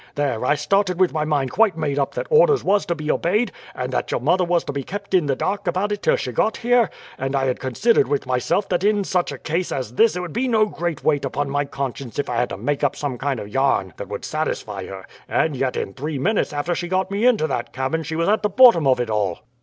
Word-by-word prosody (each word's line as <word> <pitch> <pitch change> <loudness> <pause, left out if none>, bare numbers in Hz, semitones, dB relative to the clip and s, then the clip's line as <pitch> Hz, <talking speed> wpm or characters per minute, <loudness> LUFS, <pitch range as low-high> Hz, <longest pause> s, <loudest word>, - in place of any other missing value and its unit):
There, 140 -6 -1
I 145 - +3
started 190 +2 +1
with 185 -2 +3
my 155 -1 0
mind 145 -4 0
quite 210 -6 +3
made 145 -3 -1
up 140 - -1
that - - -2
orders 460 -2 +5
was 200 +1 +2
to 170 - 0
be 155 -1 -2
obeyed, 210 +8 +1 0.2
and - - -4
that - - -1
your - - 0
mother 185 0 +2
was 175 -1 +1
to - - -5
be 140 - -2
kept 195 +8 -7
in 175 -5 +3
the 135 - +1
dark 200 +5 -2
about 185 +4 0
it 205 -1 -2
till - - +3
she 125 - -3
got 215 - 0
here; 240 -2 +3 0.3
and 135 +1 -2
I 135 -1 +1
had 130 -1 -1
considered 135 - +2
with 145 0 -1
myself 130 - 0
that 180 0 0
in 205 0 +2
such 180 -2 0
a - - -6
case 170 +3 -2
as 125 -4 -4
this 225 - +4
it 180 - -2
would 175 -4 -6
be 260 +2 0
no 220 -3 +3
great 175 -7 -4
weight 145 -3 +2
upon 145 0 -2
my 145 0 0
conscience 135 -4 -5
if 145 - -2
I 120 - -1
had 120 +1 +1
to - - -5
make 145 0 -2
up 140 - +2
some 135 -5 -4
kind 135 -3 -1
of - - -6
a - - -11
yarn 135 -8 +1
that 100 - -7
would 100 - -5
satisfy 105 -11 -3
her; 95 -1 -8 0.2
and 155 -3 +1
yet 130 0 -1
in 95 - -3
three 150 +5 -4
minutes 200 +11 0
after 150 +4 -1
she 175 +1 -3
got 185 +1 -1
me 205 +5 +2
into 225 -11 +3
that 135 -6 -3
cabin 135 +5 -2
she 160 +1 -5
was 165 +1 0
at 215 +2 +2
the 210 - +1
bottom 200 - +6
of 130 -2 +3
it 120 -2 -2
all." 100 -5 -1
155 Hz, 270 wpm, -22 LUFS, 135-195 Hz, 0.3 s, bottom